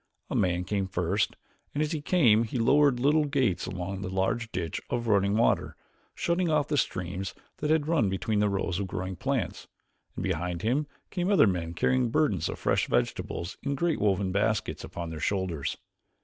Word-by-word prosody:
A - - -1
man 90 -1 +1
came 95 0 -1
first, 95 +2 0 0.4
and 150 - +2
as 155 - -2
he 155 -3 -2
came 130 -10 +4
he 115 +3 -4
lowered 140 +2 +4
little 150 +4 +3
gates 130 -10 0
along 95 +1 -4
the 95 - -4
large 95 +5 -1
ditch 85 -3 -3
of 120 -1 -2
running 100 -1 +3
water, 115 - +2 0.4
shutting 170 0 0
off 150 -2 +2
the 150 - 0
streams 95 -6 -2 0.2
that 150 - -2
had 155 -1 +2
run 155 -11 +2
between 105 +3 -1
the 105 0 +3
rows 95 -2 -1
of 100 - -2
growing 95 0 -4
plants; - - -2 0.5
and - - -4
behind 90 -1 -2
him 135 +7 +1 0.2
came 180 0 -1
other 180 -8 +6
men 85 -4 -1
carrying 125 +6 +2
burdens 115 - +1
of - - -4
fresh - - +1
vegetables 85 +2 -1
in 140 0 -1
great 165 +2 0
woven 100 -2 +1
baskets 105 -4 0
upon 85 -1 -6
their 80 - -6
shoulders. 95 -7 -1
105 Hz, 185 wpm, -28 LUFS, 95-140 Hz, 0.5 s, other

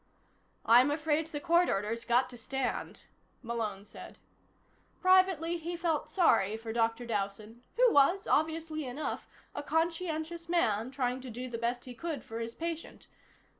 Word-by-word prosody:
"I'm 245 +4 +7
afraid 300 +1 0
the 300 -2 -5
court 340 +3 +3
order's 215 +4 -1
got 245 +2 +3
to 245 - -10
stand," 265 +2 -3 0.4
Malone 220 -4 -3
said. 210 - -12 0.8
Privately, 370 -3 +4
he 340 +1 -5
felt 330 -3 -1
sorry 220 - +3
for 225 0 -6
Dr. 230 +1 0
Dowson, 215 +1 -4
who - - +5
was, 345 +8 +4
obviously 315 0 0
enough, 265 +3 -4 0.2
a - - -4
conscientious 330 +1 -2
man 230 -10 +1
trying 255 -1 -2
to 255 - -8
do 245 +3 -5
the 235 -2 -5
best 240 +1 -2
he 250 - -8
could 310 +1 -5
for 225 +1 -6
his 230 0 -5
patient. 330 -1 -5
275 Hz, 150 wpm, -31 LUFS, 230-330 Hz, 0.8 s, I'm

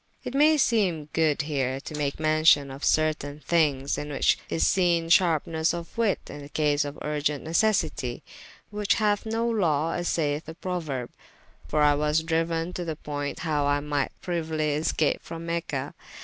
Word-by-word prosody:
It - - -5
may 305 +3 +5
seeme 190 - +1
good 155 -3 +2
here 135 -3 -1
to - - -8
make 145 -2 -2
mention 155 -3 +4
of 135 +1 -9
certayne 150 -2 0
thynges, 145 -5 +1
in 145 - -5
the 145 - -5
which - - +3
is 165 - +1
seene 170 -3 +2
sharpenesse 165 -2 +3
of 170 -1 -8
witte 225 -4 0
in 145 -1 -9
case 150 -1 +1
of 145 0 -6
vrgent 150 -1 -2
necessitie, 160 - 0 0.5
which 210 -1 +1
hath 210 0 +1
no 225 +1 0
lawe 165 -8 +1
as 175 +1 -2
sayeth 150 -1 0
the 160 - -8
prouerbe, 160 -9 -4 0.6
for 150 0 +1
I 145 0 +5
was 150 +2 +1
dryuen 165 +1 -1
to 180 - -4
the 160 -2 -4
point 145 -1 -5
howe 150 -3 0
I 145 0 +2
myght 145 -1 -1
prieuly 160 -4 -1
escape 155 0 0
from 165 0 -8
Mecha. 170 0 -3
155 Hz, 170 wpm, -26 LUFS, 145-170 Hz, 0.6 s, may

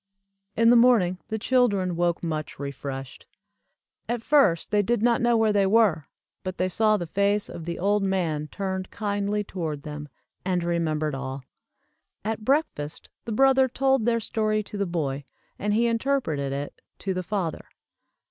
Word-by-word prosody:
In 230 +1 +6
the - - +7
morning 230 -7 +4
the 220 - -2
children 205 -7 +2
woke 175 0 0
much 155 -2 -3
refreshed. 135 -1 -6 0.8
At 240 -1 -2
first 275 - +3
they 210 -1 +4
did 225 +2 0
not 235 -1 +3
know 240 -1 +3
where 220 -1 +3
they 200 -1 +3
were, 195 -8 +3 0.4
but 185 0 -4
they 185 +1 0
saw 215 +2 +3
the 175 - -4
face 200 +4 +1
of 165 - -8
the 170 0 -4
old 205 +3 +2
man 170 -6 -1
turned 190 +1 -4
kindly 205 0 -1
toward 160 -7 -4
them, 150 -1 -7 0.3
and 180 -2 0
remembered 155 -3 0
all. 135 0 -5 0.8
At 220 0 -2
breakfast 240 - -1 0.2
the 230 - -4
brother 265 +3 +4
told 265 -2 +1
their 230 -1 +3
story 215 -1 0
to 205 - -9
the 200 - 0
boy, 145 -5 -2 0.4
and 205 - -1
he 225 +3 +3
interpreted 230 - 0
it 140 +1 -5 0.2
to 190 - -2
the 185 - -2
father. 180 -3 -3
195 Hz, 165 wpm, -26 LUFS, 165-225 Hz, 0.8 s, the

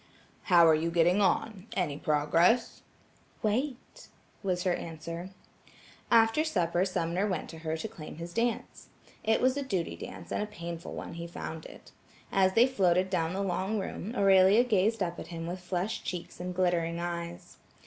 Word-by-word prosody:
"How 170 -3 +6
are 160 - +7
you 160 +2 +1
getting 175 +4 +3
on? 200 +1 0
Any 170 -7 -1
progress?" 165 +9 +2 0.6
"Wait," 255 - -2 0.3
was 180 -3 -1
her 185 - +2
answer. 165 +2 -6 0.8
After 225 +5 +5
supper 180 - +1
Sumner 180 +1 -1
went 185 -6 -3
to 165 - -10
her 160 0 -2
to 160 - -4
claim 155 -7 -10
his 170 +2 -7
dance. 235 0 -2 0.3
It 220 0 +2
was 255 +1 +3
a - - 0
duty 195 -11 -2
dance - - -9
and - - -1
a 210 - -2
painful 170 -4 -7
one - - -6
he 170 0 -6
found 160 -1 -7
it. - - -14 0.4
As 190 -1 +3
they 230 +3 +6
floated 185 -7 +2
down 165 -2 0
the 195 +1 -1
long 195 +3 -1
room, 200 +3 -5
Aurelia 195 +3 +6
gazed 220 -2 +2
up 175 -1 -4
at - - -7
him 165 -1 -6
with 175 +2 -4
flushed 180 +4 -3
cheeks 175 -2 -6
and 180 0 -4
glittering 170 -2 +1
eyes. 175 +1 -5
180 Hz, 170 wpm, -30 LUFS, 170-210 Hz, 0.8 s, are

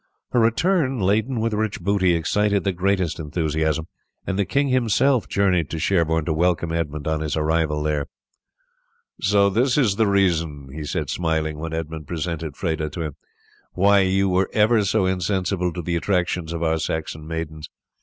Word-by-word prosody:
Her 125 - +2
return 135 - +2
laden 110 +6 +1
with 115 0 0
rich 110 -1 -1
booty 95 -1 +2
excited 100 +5 +1
the 100 - +1
greatest 95 -2 0
enthusiasm, 80 0 -1 0.4
and 95 0 -2
the 100 - +2
king 140 +8 +1
himself 130 +1 +2
journeyed 90 -5 +1
to 80 - -4
Sherborne 80 -2 +1
to 80 - 0
welcome 85 0 +1
Edmund 75 -3 -3
on 80 0 0
his 75 0 -2
arrival 75 -1 0
there. 75 -2 -1 1.1
"So 100 0 +4
this 125 +6 +2
is 110 -9 +2
the 110 -2 +3
reason," 85 -8 +1
he 75 0 -6
said - - -3
smiling, 80 -3 -1
when 80 0 -5
Edmund 80 -2 -5
presented 80 -3 -4
Freda 80 -3 -2
to 85 - -4
him, 75 -3 -5 0.6
"why 100 +2 +4
you 95 +1 +2
were 95 0 +1
ever 110 0 +4
so 100 0 +1
insensible 95 0 0
to 90 0 -6
the 85 +1 -1
attractions 90 -2 -1
to 85 0 -2
our 80 0 +1
Saxon 80 -1 -4
maidens! 80 -1 -5
90 Hz, 170 wpm, -22 LUFS, 80-100 Hz, 1.1 s, So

